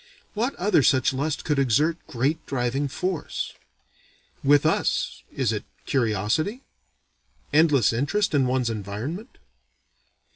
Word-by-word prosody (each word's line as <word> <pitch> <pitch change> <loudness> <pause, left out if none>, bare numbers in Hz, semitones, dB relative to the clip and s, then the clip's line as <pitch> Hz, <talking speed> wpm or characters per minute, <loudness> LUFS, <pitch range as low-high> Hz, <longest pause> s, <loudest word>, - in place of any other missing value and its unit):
What 240 +6 -1
other 190 -3 +3
such 130 0 +3
lust 145 +3 -2
could 150 -2 +1
exert 150 +6 +2
great 135 +6 -1
driving 135 +2 -1
force? 180 +3 -3 0.9
With 145 +1 +5
us - - 0
is 125 -5 0
it 105 - -3 0.2
curiosity? 125 - 0 0.9
endless 145 -7 +4
interest 165 - 0
in 135 -3 +3
one's 125 -2 0
environment? 115 - -5
140 Hz, 110 wpm, -25 LUFS, 120-160 Hz, 0.9 s, With